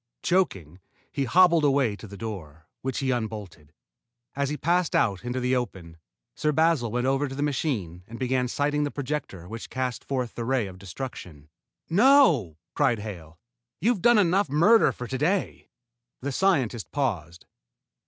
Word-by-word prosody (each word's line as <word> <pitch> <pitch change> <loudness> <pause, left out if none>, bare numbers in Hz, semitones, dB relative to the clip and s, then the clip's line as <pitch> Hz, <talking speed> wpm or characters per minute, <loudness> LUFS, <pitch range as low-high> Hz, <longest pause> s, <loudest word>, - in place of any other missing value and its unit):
Choking, 95 - 0 0.3
he 140 - -1
hobbled 170 +2 +5
away 135 -6 +2
to 110 - -10
the 100 0 -10
door, 85 -8 -7 0.2
which 130 -1 -3
he 135 -1 0
unbolted. 105 - -5 0.6
As 140 0 -1
he 150 - -3
passed 175 +4 +1
out 100 -4 +1
into 125 +1 -3
the 125 +1 +1
open, 90 -9 -5 0.4
Sir 150 - 0
Basil 160 -5 +2
went 125 +2 -1
over 135 +2 +1
to 135 - -7
the 145 - -2
machine 115 - -2
and 115 - -9
began 130 0 0
sighting 145 +3 0
the 145 - -1
projector 140 - -5
which 115 +3 -8
cast 130 -2 -3
forth 130 -4 -3
the 120 - -5
ray 125 -1 0
of 95 -1 -10
destruction. 90 - -8 0.4
"No!" 170 - +4 0.2
cried 120 - +2
Hale. 85 -7 -8 0.4
"You've 225 -3 +1
done 240 0 +5
enough 190 -3 +3
murder 170 +4 +5
for 125 - -7
to 130 - -3
day." 180 +6 -1 0.5
The 140 +2 -3
scientist 130 - 0
paused. 90 - -3
130 Hz, 165 wpm, -26 LUFS, 105-150 Hz, 0.6 s, hobbled